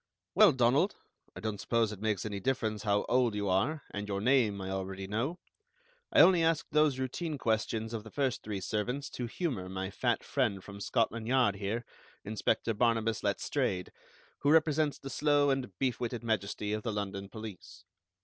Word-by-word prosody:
"Well, - - +7
Donald, 130 - +3 0.4
I - - -8
don't 110 -2 -3
suppose 115 -2 +1
it 105 -2 -8
makes 110 -3 0
any 105 -2 -3
difference 110 -2 -1
how 105 -1 +1
old 120 -3 +2
you 100 -1 -1
are, 135 +12 +1
and 105 0 -4
your 100 -1 -2
name 110 -3 +3
I 95 0 -4
already 95 0 -4
know. 115 - -2 0.7
I - - +7
only 180 -3 +7
asked 165 -1 +1
those 150 -3 +3
routine 145 +4 -3
questions 110 -1 -1
of 110 -2 -4
the 110 - -10
first 130 0 -1
three 105 -2 -4
servants 125 +8 -2
to 120 - -4
humor 115 - -3
my 95 +1 -4
fat 120 +3 0
friend 110 -9 0
from 100 0 -10
Scotland 115 +1 0
Yard 125 -6 +3
here, 105 +4 -3 0.4
Inspector 110 +2 0
Barnabas 115 0 +1
Letstrayed, 90 -1 -1 0.5
who 145 - +1
represents 155 -1 +3
the 135 - -8
slow 145 +1 +3
and 135 -5 -1
beef 130 -3 0
witted 120 -1 -3
majesty 105 -1 -1
of 110 - -1
the 115 - -2
London 100 -1 -4
police." 100 -5 -9
110 Hz, 180 wpm, -31 LUFS, 100-130 Hz, 0.7 s, Well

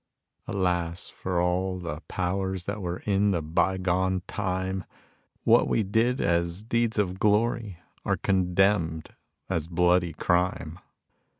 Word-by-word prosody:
Alas 90 -3 -1
for 90 -2 -3
all 90 +1 0
the 85 -4 -5
powers 95 0 -2
that 105 +1 -4
were 90 -1 -4
in 100 0 +2
the 90 -4 +1
by 85 +4 +1
gone 95 0 0
time. 95 -1 -2 0.6
What - - +5
we 110 - +1
did 115 +6 +1
as 85 +3 0
deeds 115 0 0
of 95 -2 0
glory 105 -2 +1 0.3
are - - 0
condemned 90 -3 +1 0.4
as 85 -4 -2
bloody 90 0 +2
crime. 90 -1 0
95 Hz, 125 wpm, -27 LUFS, 85-100 Hz, 0.6 s, What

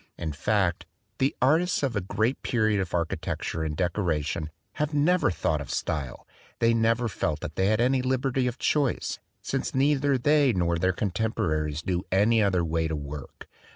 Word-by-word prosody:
In 80 -2 -3
fact, 90 +3 0 0.3
the 135 +1 +1
artists 165 +5 +3
of 130 -5 0
a 105 - 0
great 110 +7 -1
period 110 -4 +1
of 90 -2 -3
architecture 85 -1 -2
and 75 -1 -3
decoration 85 -4 -1 0.3
have 150 0 -1
never 175 +5 +3
thought 80 -3 -1
of 70 - -8
style. 70 -5 -3 0.3
They 115 0 +3
never 115 +1 +2
felt 80 -7 -2
that - - -6
they 95 - +2
had 110 +1 +2
any 130 +2 +3
liberty 130 0 0
of 125 +1 -3
choice, 145 -5 0 0.2
since - - -2
neither 140 0 +3
they 145 0 +3
nor 85 -2 0
their 95 +2 +2
contemporaries 90 -7 -1
knew 90 -1 -1
any 110 +4 +4
other 95 -4 +2
way 80 0 0
to 80 - -2
work. 70 -1 -8
105 Hz, 170 wpm, -27 LUFS, 85-130 Hz, 0.3 s, any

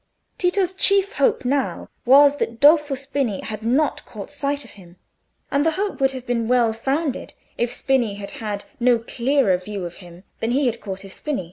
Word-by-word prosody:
Tito's 365 0 +1
chief 395 +1 +2
hope 275 -2 +2
now 270 +1 -1 0.2
was 285 +2 +7
that 230 -4 -3
Dolfo 295 -1 +5
Spini 270 -6 -2
had 215 -1 -6
not 260 +7 +1
caught 210 +2 -9
sight 285 0 -2
of - - -14
him, 180 -3 -16 0.6
and 280 0 +2
the 325 +1 +2
hope 400 -6 -2
would 270 - +4
have 260 -1 -7
been 235 -2 -1
well 240 -2 +3
founded 270 +5 -2 0.2
if 240 0 -1
Spini 245 -5 0
had 200 0 -7
had 205 -2 -4 0.2
no 245 0 +4
clearer 240 -2 +1
view 195 0 -6
of 175 - -8
him 175 -1 -14 0.2
than 225 - -1
he 280 +2 +2
had 235 -2 -1
caught 195 -1 -6
of 195 -1 -9
Spini. 300 -6 -3
250 Hz, 195 wpm, -22 LUFS, 215-285 Hz, 0.6 s, was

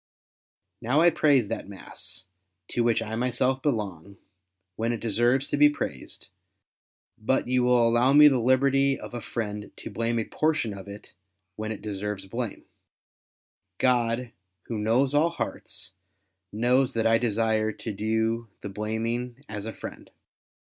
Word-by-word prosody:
Now 130 +7 +2
I 175 +1 +6
praise 145 -8 +3
that 115 - -4
mass, 95 -1 -9 0.4
to 120 - 0
w^hich 115 -1 +1
I 110 - -3
myself 125 +2 0
belong, 100 - -3 0.6
when 115 +3 -1
it 115 - -4
deserves 120 +5 +2
to - - 0
be 150 0 +7
praised; 145 - -6 0.9
but 120 +4 0
you 125 0 +2
Avill 125 -1 +4
allow 120 +3 +3
me 150 +1 +9
the 135 -3 +3
liberty 135 +2 +3
of - - -9
a 120 - -4
friend 105 -3 -4
to - - -8
blame 115 +3 -1
a 115 - -1
portion 155 -9 0
of 100 0 -10
it 100 +1 -11 0.4
when 110 0 -4
it 110 - -7
deserves 105 -1 -4
blame, 115 +2 -5 1.1
God, 120 -1 +1 0.3
Who 115 -2 -4
knows 120 +6 +2
nW 160 +3 +3
hearts, 130 - -6 0.6
knows 125 +4 +2
that 115 -1 0
I 115 0 +4
desire 110 -1 +1
to 110 - -6
do 110 +2 -1
the 100 - -5
blaming 115 +5 -3
as 105 0 -6
a - - -3
friend. - - -9
115 Hz, 150 wpm, -26 LUFS, 110-130 Hz, 1.1 s, me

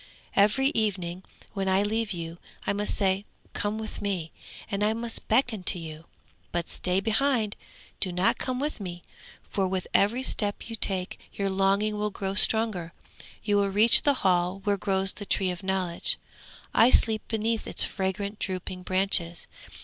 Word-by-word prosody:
Every 215 +7 +4
evening 190 - -1 0.3
when 195 -2 -1
I 190 +1 +3
leave 220 +1 -1
you 170 -1 -5 0.3
I - - +1
must 205 +1 0
say, 195 -1 +1 0.3
"Come 205 +1 -1
with 220 0 -6
me," 185 -6 -2 0.4
and 200 0 0
I 215 +1 +3
must 230 0 0
beckon 225 -2 +2
to 185 - +2
you, 160 -1 -8 0.5
but 175 -1 -2
stay 180 +1 -1
behind. 220 +1 +1 0.4
Do 185 - -1
not 180 +2 +2
come 255 -1 -2
with 295 -1 -2
me, 175 -3 -7 0.4
for 195 -2 0
with 185 -1 -2
every 230 +6 +3
step 205 -5 -2
you - - -3
take 190 -4 -2
your 195 -1 -2
longing 200 +2 +1
will 210 0 0
grow 195 -1 -3
stronger. 205 -5 +2 0.5
You 205 -1 +2
will 200 -1 +2
reach 215 +4 +6
the 285 -1 +4
hall 180 +1 +2
where 205 0 +2
grows 190 -1 +1
the 205 - -7
Tree 190 -2 +1
of 175 - -7
Knowledge; 190 -3 0 0.6
I 230 - +6
sleep 220 -3 +4
beneath 225 0 -1
its - - +3
fragrant 200 +1 -3
drooping 185 -1 -4
branches. 180 -3 0
200 Hz, 165 wpm, -27 LUFS, 185-215 Hz, 0.6 s, reach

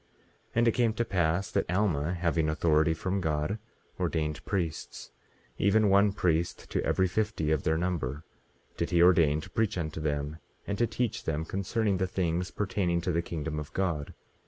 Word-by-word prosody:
18:18 - - -37 0.5
And 120 0 +4
it - - +6
came 115 -1 +2
to 120 +2 -1
pass 90 -1 0
that - - 0
Alma, 90 -4 +1
having 85 -2 +1
authority 80 +1 +2
from 95 +3 -2
God, 80 +6 -1 0.4
ordained 75 -2 -1
priests; 85 -6 -3 0.5
even 105 +1 +4
one 100 +1 +5
priest 85 -3 -1
to - - 0
every 95 - +2
fifty 90 -5 -1
of 80 -3 +2
their 80 0 +1
number 80 -5 -2 0.5
did 85 - -1
he 85 -1 +4
ordain 80 -4 +5
to 95 - -10
preach 110 -1 0
unto 80 -2 -3
them, 75 0 -2 0.3
and 100 0 -3
to 120 - +3
teach 115 0 -2
them 80 0 -1
concerning 100 +2 0
the 95 0 0
things 90 -1 -1
pertaining 95 -4 0
to 90 - -1
the 85 0 +1
kingdom 80 -2 -4
of 75 - -7
God. 85 -7 -2
85 Hz, 180 wpm, -29 LUFS, 80-100 Hz, 0.5 s, it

